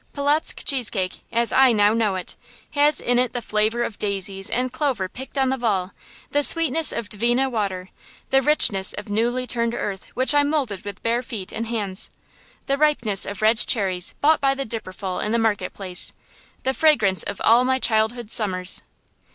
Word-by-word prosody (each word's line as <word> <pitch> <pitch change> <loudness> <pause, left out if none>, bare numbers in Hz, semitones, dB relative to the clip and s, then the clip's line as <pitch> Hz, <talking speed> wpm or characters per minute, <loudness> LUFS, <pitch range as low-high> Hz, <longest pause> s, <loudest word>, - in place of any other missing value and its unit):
Polotzk 290 +2 +1
cheese 255 -5 +3
cake, 185 -3 -3
as 235 0 +1
I 265 -1 +5
now 205 0 +3
know 220 -4 0
it, 185 - -4 0.4
has 290 +1 +3
in 245 0 +1
it 250 -1 0
the 245 - -2
flavor 215 +3 0
of 225 - -6
daisies 195 -1 -1
and 250 +1 -1
clover 265 -11 -1
picked 265 +8 -8
on 265 -1 +2
the 265 - -1
Vall; 200 -5 -1 0.4
the 290 - +2
sweetness 325 0 +3
of 235 -2 -4
Dvina 240 +6 0
water; 195 -5 -3 0.4
the 270 0 +4
richness 240 -9 +4
of 205 0 -8
newly 240 +4 0
turned 235 -1 -1
earth 195 -2 -5
which 260 +3 +3
I 290 - +5
moulded 285 -10 -2
with 200 -2 -8
bare 235 +1 0
feet 220 -6 -7
and 225 +1 -4
hands; 205 -4 -2 0.6
the 275 0 -1
ripeness 245 -10 +2
of 200 +1 -6
red 220 +1 +3
cherries 190 -7 -1
bought 310 +2 +3
by 275 -1 +2
the 275 0 -4
dipperful 190 -4 -5
in 210 - -2
the - - +3
market 210 -5 0
place; 185 -3 -3 0.5
the 265 - 0
fragrance 240 -12 +3
of - - -4
all 235 +2 +5
my 260 +1 +1
childhood's 225 -1 0
summers. 185 -4 +2
230 Hz, 185 wpm, -22 LUFS, 200-265 Hz, 0.6 s, I